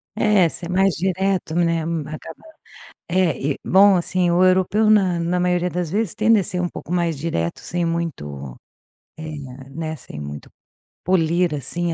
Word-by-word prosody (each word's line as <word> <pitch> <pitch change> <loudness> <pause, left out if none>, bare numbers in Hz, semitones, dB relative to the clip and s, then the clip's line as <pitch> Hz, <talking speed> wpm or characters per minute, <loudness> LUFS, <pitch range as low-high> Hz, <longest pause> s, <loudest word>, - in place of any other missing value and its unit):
É, 210 -5 +4
ser 170 +1 -7
mais 190 0 +3
direto, 190 -1 -1
né, 165 -1 +1
um 160 -2 -3
acaba, 155 0 -9 0.7
é 175 -3 +2 0.2
e - - -10
bom 195 +1 +6
assim, 175 0 0
o 175 +2 +4
europeu 190 +4 +3
na 190 -5 +3
na 175 +2 0
maioria 180 0 +1
das 175 -2 -3
vezes 210 0 -1
tende 220 +1 +4
a - - -3
ser 180 - -3
um 175 - 0
pouco 170 - -8
mais 170 -3 0
direto 135 - -2
sem 175 -1 -2
muito, 75 - -4 0.6
eh, 155 0 -7 0.4
né, 160 0 -4
sem 130 - -10
muito, 75 0 -8 0.5
polir 175 -1 +2
assim 165 +5 -2
175 Hz, 165 wpm, -21 LUFS, 160-185 Hz, 0.7 s, bom